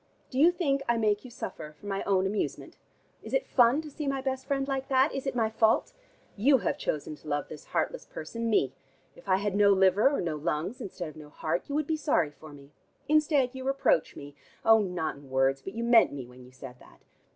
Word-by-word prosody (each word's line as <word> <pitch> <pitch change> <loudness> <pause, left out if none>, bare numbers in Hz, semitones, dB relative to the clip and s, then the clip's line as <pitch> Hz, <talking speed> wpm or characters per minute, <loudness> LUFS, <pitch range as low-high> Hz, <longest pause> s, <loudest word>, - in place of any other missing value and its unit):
Do 260 - -2
you 330 +4 +7
think 285 -6 0
I 235 - +3
make 210 -2 +1
you 255 - -10
suffer 155 -9 -7
for - - -15
my 195 -1 -2
own 190 -1 +2
amusement? 200 +2 -3 0.5
Is - - -4
it - - +1
fun 250 +5 +3
to 305 - -9
see 295 +1 -5
my 275 0 0
best 265 0 -3
friend 275 -1 -1
like 270 -1 -2
that? 265 +2 +3
Is 270 0 -4
it 270 - -2
my 225 -2 +2
fault? 220 0 +2 0.4
You 265 +7 +4
have - - -1
chosen 150 0 -3
to 155 - -16
love 145 -1 -2
this 150 - -10
heartless - - -2
person, 230 0 -5
me. 140 - +2 0.4
If - - -14
I 185 - +5
had 200 0 -1
no 205 0 +5
liver, 190 +5 +4
or 285 - -1
no 165 -3 -2
lungs, 160 +8 -3
instead 180 -4 -6
of 155 - -14
no 150 -1 -11
heart, 160 - -3
you 285 - -2
would 305 0 +1
be 315 +1 -1
sorry 175 - +1
for 155 +1 -14
me. 140 0 -14 0.4
Instead 295 -4 +3
you 260 -1 -7
reproach 270 - +1
me. 145 0 -10 0.3
Oh, 225 0 +7
not 180 -7 -2
in 140 -1 -15
words, 135 +1 +1
but 195 - -8
you 230 - -3
meant 235 -1 +5
me, 135 -3 -6
when 125 +1 -15
you 125 - -15
said 130 -1 -11
that. - - -19
210 Hz, 235 wpm, -28 LUFS, -, 0.5 s, you